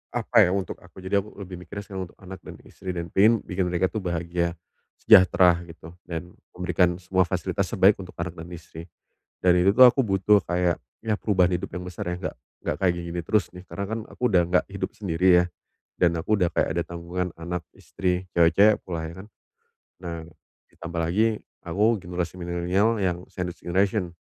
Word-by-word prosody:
apa 120 0 0
ya, - - 0
untuk 95 -1 -3
aku. 95 - -15
Jadi, 100 +2 +2
aku 105 +2 -9
lebih 90 -1 -9
mikirnya 95 +4 -8
sekarang 95 -3 -6
untuk - - -28
anak 95 0 -9
dan - - -9
istri 90 -1 -7
dan 85 0 -5
pengen 110 +3 +4
bikin 90 -1 -2
mereka 90 +1 +1
tuh 110 - -2
bahagia, 85 -1 -2 0.5
sejahtera 90 -2 +6
gitu, 80 -1 -12 0.2
dan 85 +1 -6 0.2
memberikan 90 -1 +1
semua 95 0 +1
fasilitas - - -1
terbaik 100 +2 +4
untuk 90 -2 -9
anak 85 +1 -3
dan 80 +1 -8
istri. 80 0 -11 0.6
Dan 90 -1 +6
itu 95 +2 +5
tuh 130 - +9
aku 125 +2 +5
butuh 100 +1 +4
kayak, 90 -1 0 0.2
ya 110 -2 0
perubahan 95 -4 +2
hidup 95 +2 -6
yang 90 - -4
besar 90 -1 -6
ya, 90 - -2
enggak 90 - -4 0.3
enggak - - -2
kayak 95 -2 +4
gini 85 - -5
gini 85 - -2
terus 105 -2 +2
nih, 90 0 -10
karena 100 - -4
kan 115 +1 -2
aku - - -17
udah 90 -2 +5
enggak 90 +1 +2
hidup 100 - -3
sendiri 95 -2 +1
ya, - - -3 0.6
dan 90 - +5
aku 105 +6 +1
udah 90 - +3
kayak - - +1
ada 85 - +2
tanggungan 85 +2 -4
anak, 85 +1 -4
istri, 90 -1 -2
cewek-cewek 100 +6 +5
pula, 85 -3 -4
ya 80 - -9
kan? - - -15 0.8
Nah, 85 -2 -5 0.5
ditambah 85 0 -6
lagi 105 +7 +1 0.3
aku 95 +5 +1 0.2
generasi 90 0 -4
milenial 90 +5 0
yang 90 -2 -1
sandwich 90 -1 -5
generation. 95 +1 0
90 Hz, 195 wpm, -25 LUFS, 85-95 Hz, 0.8 s, tuh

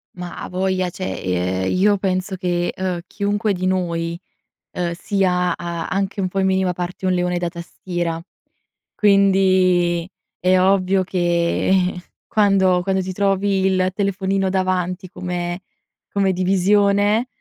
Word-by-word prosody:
Ma 180 -1 -7
avoglia, 185 0 -1
cioè, 185 +2 -5 0.4
ehm, 95 - 0
io 200 +2 +3
penso 190 0 -1
che, 175 -1 -1
ehm, 185 -2 -2
chiunque 205 +2 -1
di 185 0 -3
noi, 170 -2 -1 0.5
ehm, 175 -1 -2
sia 180 -1 0
a 170 -1 -5
anche 195 +1 -2
un 190 - +1
po', 195 +2 -3
in 190 - +2
minima 190 -1 +1
parte, 180 +1 -5
un 185 - +2
leone 180 0 0
da 175 - -1
tastiera. 170 -1 -4 0.7
Quindi, 185 -3 +3 0.3
è 185 +1 +3
ovvio 190 0 +3
che, 180 +1 +1 0.3
quando 195 -4 +3
quando 190 0 0
ti 185 0 -5
trovi 195 0 +1
il 185 -1 +1
telefonino 195 -1 0
davanti 185 0 -1
come 175 0 -4 0.5
come 195 -2 +1
divisione, 200 +4 +2
185 Hz, 130 wpm, -20 LUFS, 180-195 Hz, 0.7 s, io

